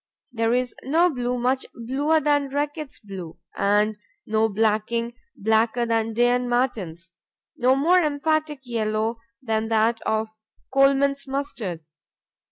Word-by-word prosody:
There 230 -1 0
is 250 0 0
no 335 +6 +3
blue 250 -2 -2
much 255 +2 +1
bluer 275 +7 +1
than 290 -1 +1
Reckitt's 290 +1 -3
Blue 190 -5 -8 0.2
and 210 +1 +2 0.3
no 220 +1 +2
blacking 220 +3 0 0.2
blacker 225 +3 +2
than 225 -1 0
Day 240 +2 +3
and 245 0 +1
Martin's; 190 -10 -1 0.4
no 255 +2 +3
more 345 +7 +4
emphatic 305 -1 0
yellow 220 -1 -1 0.3
than 220 -2 0
that 225 +1 +2
of 220 0 -1 0.4
Colman's 275 0 +3
Mustard. 250 - -4
240 Hz, 125 wpm, -24 LUFS, 220-275 Hz, 0.4 s, more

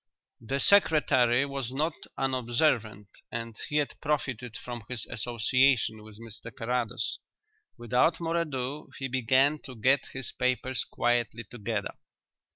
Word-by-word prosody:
The 135 +5 -1
secretary 140 -9 +5
was 135 -3 -4
not 150 +5 0 0.2
unobservant 120 -5 0 0.2
and 115 -1 -4
he 150 - -3
had 150 -1 0
profited 135 -6 -2
from 120 -2 -7
his 125 -4 -3
association 120 0 +2
with 105 -1 -11
Mr 115 0 -9
Carrados. 120 0 -2 0.6
Without 125 +7 +2
more 165 0 -1
ado, 145 -2 -3
he 135 - -3
began 130 +4 +3
to 130 - -10
get 130 +5 +4
his 135 -1 -4
papers 125 -1 0
quietly 120 -1 0
together. 105 -2 -4
125 Hz, 125 wpm, -28 LUFS, 115-140 Hz, 0.6 s, secretary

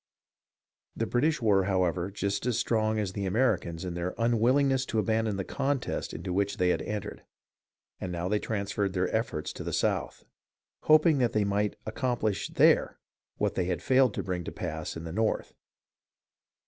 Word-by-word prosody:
The 115 - -1
British 135 +4 +1
were, 100 -4 +4
however, 90 -2 0
just 100 +2 -2
as 120 - +1
strong 110 -1 +1
as 100 -3 -2
the 100 0 -2
Americans 95 -6 0
in 90 - -3
their 85 +1 -3
unwillingness 125 +4 +3
to 110 - -2
abandon 110 -1 +1
the 95 - -2
contest 135 +5 -2
into 90 - -5
which 100 +1 0
they 90 - +2
had - - +1
entered, 105 -1 -5 0.8
and 90 - -4
now 85 0 -2
they 105 +2 +1
transferred 100 -2 -2
their 90 +3 0
efforts 110 -9 -2
to - - -7
the - - -4
South, - - -1 0.6
hoping 155 -1 +5
that 120 -3 +1
they 105 - +2
might 100 +1 0
accom 120 +2 -1
plish 105 -3 -1
there - - +4 0.4
what - - 0
they 90 - 0
had 85 -2 -2
failed 130 -4 +4
to - - -2
bring 90 -2 -3
to - - -5
pass - - -5
in 80 - -7
the 80 -1 -6
North. 110 +2 -1
105 Hz, 175 wpm, -29 LUFS, 95-115 Hz, 0.8 s, hoping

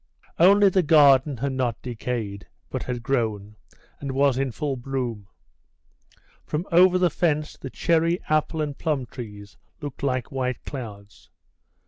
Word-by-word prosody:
Only 200 +3 +7
the 190 0 +3
garden 145 -3 +5
had 140 +4 -2
not 125 -3 -1
decayed, 115 -4 -4 0.2
but - - -3
had 120 -2 -4
grown, 110 -5 -1 0.4
and 140 -1 -4
was 135 -1 +2
in 135 -1 0
full 145 +2 -3
bloom; 120 -5 -4 1.2
from 155 +4 -3
over 180 +2 +6
the 180 -2 +2
fence 155 -2 0
the 135 - -8
cherry, 165 +4 +1
apple, 155 +1 +1
and 145 -2 -4
plum 145 -5 -1
trees 105 -5 -10 0.2
looked 145 -4 -7
like 130 -1 -1
white 130 -3 -3
clouds. 105 -7 -9
135 Hz, 140 wpm, -24 LUFS, 120-155 Hz, 1.2 s, Only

